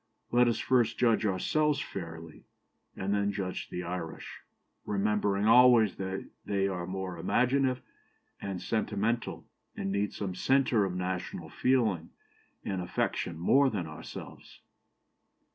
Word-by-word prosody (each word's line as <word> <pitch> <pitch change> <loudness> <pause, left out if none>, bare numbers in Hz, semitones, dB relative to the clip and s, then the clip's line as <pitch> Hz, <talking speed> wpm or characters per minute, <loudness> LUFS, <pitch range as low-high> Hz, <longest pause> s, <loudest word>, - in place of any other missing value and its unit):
Let 120 0 +5
us 115 - +1
first 120 -3 +2
judge 115 -3 +3
ourselves 145 +10 +1
fairly, 80 - -7 0.5
and 95 +1 -1
then 100 0 +1
judge 95 -2 -4
the 90 - -4
Irish, 85 -2 -6 0.4
remembering 105 0 +1
always 115 -2 +6
that 95 0 -4 0.2
they 100 -1 0
are 90 -3 -3
more 95 -2 -4
imaginative 125 +7 +1 0.6
and 95 -2 -4
sentimental, 110 +2 -1 0.3
and 95 - -2
need 100 +1 0
some 95 -3 -4
centre 125 0 +3
of 90 -2 -3
national 90 0 -4
feeling 110 -11 +1 0.6
and 95 -2 -2
affection 90 -1 -2
more 135 +11 +4
than 100 -8 -3
ourselves." 80 -1 -10
100 Hz, 125 wpm, -30 LUFS, 90-120 Hz, 0.6 s, always